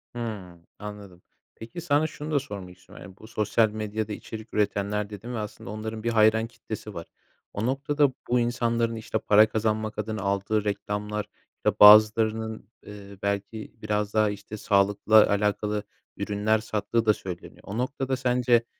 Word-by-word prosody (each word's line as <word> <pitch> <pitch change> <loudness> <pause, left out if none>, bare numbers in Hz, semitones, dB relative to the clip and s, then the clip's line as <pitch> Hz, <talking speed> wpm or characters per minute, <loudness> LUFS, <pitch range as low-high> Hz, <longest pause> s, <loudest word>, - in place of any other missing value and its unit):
Hıı, 100 -7 -6 0.2
anladım. 105 -4 -9 0.3
Peki, 115 +9 -8
sana 155 -1 +2
şunu 150 0 -7
da 145 - +3
sormak 95 -9 -8
istiyorum, 90 - -14
yani, 95 +2 -13
bu 110 - -13
sosyal 110 0 +2
medyada 110 0 -4
içerik 110 +1 -9
üretenler 105 0 0
dedin 110 +4 -7
ve - - -3
aslında 105 -1 -7
onların 110 +1 -5
bir 120 - 0
hayran 110 0 +4
kitlesi 110 -3 -8
var. 85 -1 -7 0.5
O 105 +3 -2
noktada 140 +1 +1 0.2
bu 125 0 +2
insanların, 115 -1 0
işte, 110 0 -3
para 105 +1 +5
kazanmak 110 0 -1
adına 110 -1 -3
aldığı 100 +2 0
reklamlar, 105 0 -3 0.5
bazılarının, 110 +1 +6 0.2
ııı, 100 -1 -10
belki 100 +2 -3
biraz 105 -1 -1
daha, 110 -1 +3
işte, 105 +1 -7
sağlıkla 105 +1 +4
alakalı 105 +1 0 0.3
ürünler 105 +2 +1
sattığı 110 +1 -1
da 105 - +5
söyleniyor. 90 -3 -9
O 105 +3 -5
noktada 130 +1 -1
sence 125 -2 +2
110 Hz, 150 wpm, -26 LUFS, 105-115 Hz, 0.5 s, bazılarının